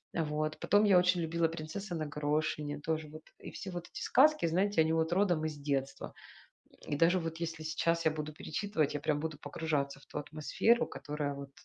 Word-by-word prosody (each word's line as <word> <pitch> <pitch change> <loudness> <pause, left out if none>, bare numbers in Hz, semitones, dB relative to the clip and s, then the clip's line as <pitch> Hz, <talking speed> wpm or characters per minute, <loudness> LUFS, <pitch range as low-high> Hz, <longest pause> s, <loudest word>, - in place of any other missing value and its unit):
А 165 - +1
вот 155 +1 -2
потом 205 +1 +4
я 195 -3 +6
очень 180 -1 +3
любила 165 0 +1
"Принцесса 170 +4 -5
на 155 -1 -2
горошине" 150 0 -1
тоже 155 0 -2
вот. 155 +1 -10 0.2
И - - -9
все 190 - -7
вот 175 -1 -6
эти - - -8
сказки, 305 - +4
знаете, 185 +2 +2
они 160 +1 +2
вот 160 +1 +1
родом 175 -5 +2
из 155 -2 -3
детства. 140 -1 -3 0.7
И 145 - -1
даже 170 +4 +4
вот 165 -1 -4
если 165 -1 -4
сейчас 165 +1 0
я 160 - +5
буду 155 0 -5
перечитывать, 160 -2 -1
я 145 - -2
прям 150 -1 +1
буду 155 -1 -4
погружаться 145 -2 -2
в 135 - -19
ту - - -8
атмосферу, 155 +11 +1
которая 145 -1 -4
вот 140 0 -8
160 Hz, 200 wpm, -32 LUFS, 150-170 Hz, 0.7 s, я